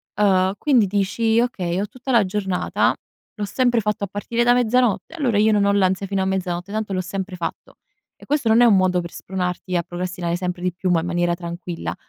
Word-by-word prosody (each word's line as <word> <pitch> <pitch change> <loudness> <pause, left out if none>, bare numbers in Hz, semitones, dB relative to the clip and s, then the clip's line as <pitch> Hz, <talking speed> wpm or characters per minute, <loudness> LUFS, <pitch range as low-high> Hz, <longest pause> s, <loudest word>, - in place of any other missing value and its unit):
Ehm, 190 -2 +3
quindi 255 -4 +3
dici: 205 +3 +1
"Okay, 185 -7 -1
ho 205 - -2
tutta 255 +4 -6
la 230 -5 +4
giornata, 190 -1 0 0.4
l'ho 210 - -3
sempre 245 +2 +1
fatto 210 -1 -2
a - - -1
partire 205 +4 -2
da 240 0 +5
mezzanotte, 245 +2 +1
allora 255 -10 0
io 215 +1 +4
non 205 -1 +3
ho 200 - +3
l'ansia 195 -1 +1
fino 195 0 -1
a - - -1
mezzanotte, 185 0 -2
tanto 215 -1 -3
l'ho 185 - -1
sempre 190 +1 -5
fatto". 170 - -6 0.4
E - - -15
questo 285 -5 0
non 220 +1 +5
è 245 - +7
un 225 -4 +6
modo 185 -1 +2
per 170 -1 -6
spronarti 180 -1 -3
a 170 - 0
procrastinare 175 0 -3
sempre 180 0 -4
di 180 -1 -1
più, 180 +1 -2
ma 175 -2 +3
in 165 - -4
maniera 175 0 0
tranquilla; 170 - -6
195 Hz, 220 wpm, -21 LUFS, 180-220 Hz, 0.4 s, è